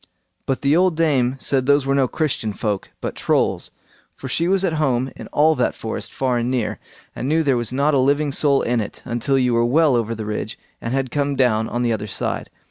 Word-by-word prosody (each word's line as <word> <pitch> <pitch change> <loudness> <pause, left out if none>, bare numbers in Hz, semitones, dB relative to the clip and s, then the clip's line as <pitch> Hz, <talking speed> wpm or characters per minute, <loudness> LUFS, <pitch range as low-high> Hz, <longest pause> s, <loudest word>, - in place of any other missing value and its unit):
But 135 0 -1
the 140 +2 +3
old 180 -1 +3
dame 135 -6 +2
said 130 -1 0
those 145 -1 +4
were 135 - +1
no 135 -2 +3
Christian 125 -8 -2
folk, 105 -2 -3
but - - -3
Trolls, - - 0 0.5
for 135 - -8
she 165 +6 0
was 195 +1 +2
at 170 - 0
home 130 -2 +1
in - - -9
all 155 +2 +3
that 125 -5 0
forest 110 - -5
far 125 -2 0
and 120 +1 -1
near, 125 -4 -1 0.4
and 130 - -3
knew 160 +1 +2
there 140 -3 +2
was 120 -1 -2
not 140 +4 +1
a 140 - +3
living 140 +2 +2
soul 140 0 +2
in 120 -1 +1
it, 105 - -7
until 125 +2 0
you 125 -2 +2
were 115 0 +3
well 145 +3 +3
over 115 -1 -1
the 110 -1 -5
ridge, 105 0 -4 0.2
and 115 +3 -2
had 135 -2 -1
come 145 -1 0
down 110 -4 +2
on 120 +1 -1
the 120 -1 +1
other 105 -1 -4
side. - - -3
130 Hz, 230 wpm, -21 LUFS, 120-145 Hz, 0.5 s, those